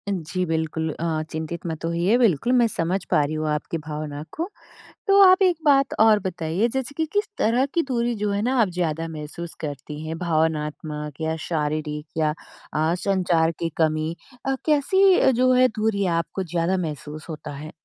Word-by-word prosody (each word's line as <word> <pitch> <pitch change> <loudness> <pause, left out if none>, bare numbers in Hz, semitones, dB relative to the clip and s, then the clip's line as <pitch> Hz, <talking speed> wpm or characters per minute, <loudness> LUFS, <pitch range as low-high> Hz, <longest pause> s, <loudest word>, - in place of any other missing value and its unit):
जी, 180 +2 -2
बिल्कुल। 160 0 -1
अ, 160 -2 -1
चिंतित 160 +2 -5
मत 160 0 -4
होइए, 170 +7 +2
बिल्कुल 235 - +2
मैं 240 -2 +5
समझ 180 -1 -1
पा 150 - +4
रही 150 +2 -2
हूँ 155 0 -2
आपकी 150 +2 -2
भावना 150 -1 -5
को। 340 +5 -3 0.6
तो 395 0 +6
आप 370 +1 +5
एक 360 -2 +4
बात 275 -2 +4
और 220 -1 +6
बताइए 185 +3 -1
जैसे 265 +1 -2
कि 320 - +1
किस 410 +1 +1
तरह 245 +4 +2
की 335 - +3
दूरी 240 -2 0
जो 210 0 -1
है 200 +1 0
ना 255 +4 0
आप 200 - +2
ज़्यादा 165 -2 -1
महसूस 160 +2 -7
करती 150 0 -6
हैं? 160 +1 -4
भावनात्मक 155 -2 -2
या 160 0 0
शारीरिक 150 -1 -2
या 155 -1 +2 0.4
अ, 155 +2 +1
संचार 175 -4 +2
की 165 - -1
कमी 155 0 +1 0.3
अ, 270 - +2
कैसी 360 +2 +4
जो 255 +1 +3
है 255 0 +6
दूरी 215 -3 0
आपको 190 +3 -4
ज़्यादा 175 +2 0
महसूस 155 -1 -5
होता 155 -1 -6
है? 150 +2 -8
170 Hz, 180 wpm, -24 LUFS, 155-220 Hz, 0.6 s, तो